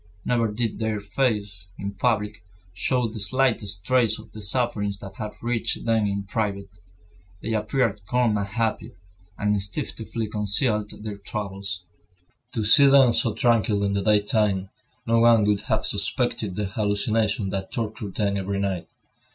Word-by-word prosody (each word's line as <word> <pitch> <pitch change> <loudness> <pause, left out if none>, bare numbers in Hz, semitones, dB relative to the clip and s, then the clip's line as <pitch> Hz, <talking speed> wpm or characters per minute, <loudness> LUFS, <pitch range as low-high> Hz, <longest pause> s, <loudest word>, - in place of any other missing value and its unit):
Never 115 -3 +1
did 110 0 -2
their 110 -1 -1
faces, 100 -4 -1
in 100 0 -4
public, 105 -2 -1 0.3
show 125 +6 +1
the 110 0 -6
slightest 105 -5 +2
trace 120 -3 +3
of 110 0 -13
the 110 - -9
sufferings 105 -2 +1
that 95 -1 -10
had 105 -1 -5
reached 120 -1 -1
them 110 -2 +2
in 100 0 -2
private. 100 -2 -3 0.7
They 115 - -2
appeared 110 -1 0
calm 125 -2 +2
and 100 -1 -1
happy, 110 +2 -2 0.4
and 105 0 +1
instinctively 110 +2 -2
concealed 105 +1 +1
their 105 -2 -6
troubles. 100 -3 -4 0.7
To 110 - 0
see 140 +7 +7
them 135 -3 +6
so 115 -4 +1
tranquil 115 -5 +2
in 100 0 0
the 100 - 0
daytime, 105 -2 +1 0.3
no 115 0 +3
one 115 -2 +6
would 105 -1 +2
have - - +1
suspected 95 -4 -1
the 105 - -1
hallucinations 105 +1 0
that 95 -1 -4
tortured 110 -4 -4
them 100 -2 0
every 100 +1 -2
night. 95 -3 -2
105 Hz, 150 wpm, -24 LUFS, 100-115 Hz, 0.7 s, see